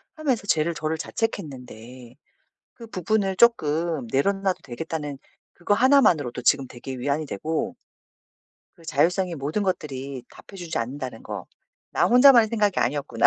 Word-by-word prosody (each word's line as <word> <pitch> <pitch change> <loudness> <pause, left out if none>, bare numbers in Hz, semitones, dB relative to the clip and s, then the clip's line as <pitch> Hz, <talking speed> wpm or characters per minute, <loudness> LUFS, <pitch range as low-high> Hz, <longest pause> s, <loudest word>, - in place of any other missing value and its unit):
하면서 265 -9 -1
쟤를 165 0 +1
저를 155 +1 -2
자책했는데 125 - -5 0.6
'그 230 -2 -12
부분을 195 0 -1
쪼끔 160 - +2
내려놔도 195 +6 0
되겠다.'는 145 +1 -5 0.4
그거 180 +4 +1
하나만으로도 205 - +3
지금 135 +1 +2
되게 130 +2 -8
위안이 145 +4 -1
되고 160 - -3 1.0
그 165 -3 -20
자율성의 180 0 +1
모든 150 +8 -2
것들이 140 -8 -3
답해주지 175 -4 -7
않는다는 130 +2 -5
거. - - -7 0.5
'나 - - +2
혼자만의 245 -2 +7
생각이 210 -4 +1
아니었구나. 130 -2 +1
160 Hz, 340 characters per minute, -24 LUFS, 135-200 Hz, 1.0 s, 혼자만의